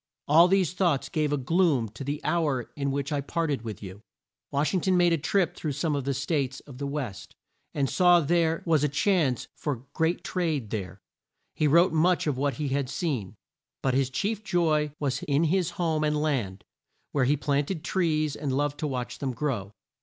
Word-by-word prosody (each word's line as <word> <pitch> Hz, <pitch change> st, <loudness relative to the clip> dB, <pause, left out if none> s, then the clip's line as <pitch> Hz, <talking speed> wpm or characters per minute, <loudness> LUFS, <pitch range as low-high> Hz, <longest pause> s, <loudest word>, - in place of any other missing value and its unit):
All 165 Hz, +4 st, +7 dB
these 185 Hz, -2 st, +2 dB
thoughts 155 Hz, -8 st, +1 dB
gave 150 Hz, -1 st, 0 dB
a 145 Hz, -, +1 dB
gloom 145 Hz, -3 st, +2 dB
to 110 Hz, +6 st, -8 dB
the 145 Hz, +2 st, -3 dB
hour 145 Hz, -8 st, 0 dB
in 140 Hz, -1 st, -1 dB
which 140 Hz, +2 st, -2 dB
I 145 Hz, -1 st, 0 dB
parted 150 Hz, -2 st, -1 dB
with 110 Hz, -2 st, -7 dB
you." 95 Hz, +1 st, -9 dB, 0.5 s
Wash 145 Hz, +3 st, 0 dB
ing 185 Hz, -, +1 dB
ton 185 Hz, +1 st, +2 dB
made 175 Hz, -1 st, +4 dB
a -, -, +3 dB
trip 180 Hz, +3 st, +1 dB
through 150 Hz, -3 st, -3 dB
some 150 Hz, +2 st, -1 dB
of 140 Hz, -2 st, -2 dB
the 140 Hz, -1 st, 0 dB
states 140 Hz, -1 st, -1 dB
of 135 Hz, -3 st, -13 dB
the 140 Hz, -, -2 dB
West, 140 Hz, -9 st, -5 dB, 0.4 s
and 140 Hz, -2 st, +1 dB
saw 175 Hz, +3 st, +5 dB
there 165 Hz, +1 st, +1 dB
was 160 Hz, -4 st, +3 dB
a 150 Hz, -, +2 dB
chance 145 Hz, -, +1 dB
for 135 Hz, -4 st, -4 dB
great 165 Hz, +2 st, 0 dB
trade 155 Hz, -, -2 dB
there, 100 Hz, -4 st, -3 dB
and 95 Hz, -, -21 dB, 0.5 s
he 155 Hz, -, +1 dB
wrote 170 Hz, +4 st, +5 dB
much 170 Hz, +3 st, +3 dB
of 150 Hz, -3 st, 0 dB
what 140 Hz, +1 st, 0 dB
he 150 Hz, -2 st, -2 dB
had 135 Hz, -1 st, -1 dB
seen. 130 Hz, -, -3 dB, 0.5 s
But 130 Hz, -, +2 dB
his 135 Hz, 0 st, +2 dB
chief 210 Hz, -, -2 dB
joy 160 Hz, -6 st, +1 dB
was 140 Hz, -3 st, -1 dB
in 145 Hz, +2 st, +1 dB
his 175 Hz, +1 st, +1 dB
home 160 Hz, -3 st, 0 dB
and 150 Hz, 0 st, +1 dB
land, 120 Hz, -11 st, -1 dB, 0.5 s
where 135 Hz, -3 st, +2 dB
he 145 Hz, +3 st, +2 dB
planted 145 Hz, +4 st, -1 dB
trees 155 Hz, -5 st, 0 dB
and 145 Hz, -2 st, -3 dB
loved 145 Hz, +2 st, -1 dB
to 155 Hz, -, -1 dB
watch 125 Hz, -3 st, -4 dB
them 135 Hz, -2 st, -2 dB
grow. 115 Hz, -8 st, -2 dB
145 Hz, 205 wpm, -27 LUFS, 135-165 Hz, 0.5 s, All